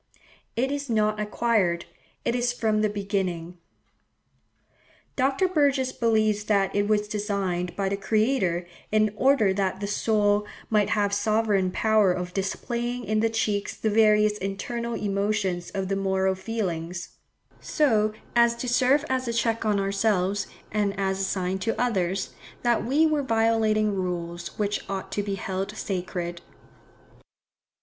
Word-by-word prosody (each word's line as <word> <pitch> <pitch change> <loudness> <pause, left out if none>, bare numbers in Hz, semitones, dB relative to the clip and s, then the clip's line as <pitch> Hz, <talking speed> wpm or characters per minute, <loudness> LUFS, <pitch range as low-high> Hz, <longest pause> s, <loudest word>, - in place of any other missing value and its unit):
It 260 +4 0
is 285 -1 -3
not 215 -1 +1
acquired; 210 -5 +1 0.4
it - - +1
is 245 0 +1
from 215 -3 +1
the 215 - +2
beginning." 190 -4 -3 1.6
Dr. 270 +7 +2
Burgess 280 -6 +2
believes 215 -3 +1
that 200 -3 +1
it 205 0 +2
was 210 -1 +1
designed 200 -4 -2
by 195 -1 -1
the 195 +1 -1
Creator 215 -4 +1 0.3
in 215 -1 +3
"order 255 -5 +3
that 190 -1 -1
the 200 - -3
soul 210 0 +1 0.2
might 210 -2 +3
have 205 -2 +1
sovereign 205 -2 +2
power 215 0 +3
of 180 0 -3
displaying 240 +5 -2
in 215 +1 +1
the 225 +1 +2
cheeks 210 -2 -1
the 220 - 0
various 210 -1 +4
internal 235 +5 -3
emotions 200 -3 -1
of 195 -1 -3
the 195 - 0
moral 190 -1 +1
feelings;" 180 -4 -4 0.5
so 220 -8 +2 0.2
as 235 0 +5
to 250 - -5
serve 260 +4 +3
as 260 -1 -1
a - - 0
check 230 -1 0
on 210 -2 +2
ourselves, 195 0 0 0.2
and 205 -1 0
as 190 0 0
a - - 0
sign 190 0 -1
to 225 +3 -2
others, 195 -6 0 0.3
that 240 -1 +2
we 285 +7 +3
were 305 -2 +2
violating 225 -3 +2
rules 175 -2 -4
which 210 -1 -1
ought 195 -1 -4
to 205 - -1
be 200 -1 -3
held 195 +2 -4
sacred. 175 -2 -4
210 Hz, 145 wpm, -26 LUFS, 195-225 Hz, 1.6 s, as